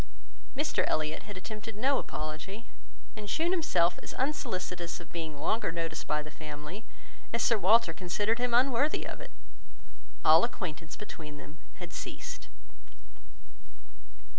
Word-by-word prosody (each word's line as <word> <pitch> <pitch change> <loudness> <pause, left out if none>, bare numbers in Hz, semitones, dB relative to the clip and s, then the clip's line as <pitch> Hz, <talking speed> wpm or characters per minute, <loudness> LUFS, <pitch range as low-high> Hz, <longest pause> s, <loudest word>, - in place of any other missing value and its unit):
Mr 300 +2 +2
Elliot 155 0 +1
had 205 - -6
attempted 215 +3 -6
no 265 +6 +3
apology, 155 +9 -5 0.5
and 210 -1 -6
shewn 330 - +2
himself 175 - +3
as - - -6
unsolicitous 185 - -1
of 170 - -11
being 160 -3 -4
longer 220 +2 +2
noticed 165 -1 -3
by 150 0 +1
the 155 - -9
family, 155 +6 -7 0.5
as 235 - +2
Sir 230 - +6
Walter 210 -2 +6
considered 205 +7 +1
him 245 0 +2
unworthy 265 +4 +4
of - - -5
it: - - -7 1.0
all 160 +2 +9
acquaintance 170 -8 -3
between 155 -8 -8
them 155 +2 -11 0.2
had 175 -2 -8
ceased. - - -5
185 Hz, 135 wpm, -31 LUFS, 160-230 Hz, 1.0 s, all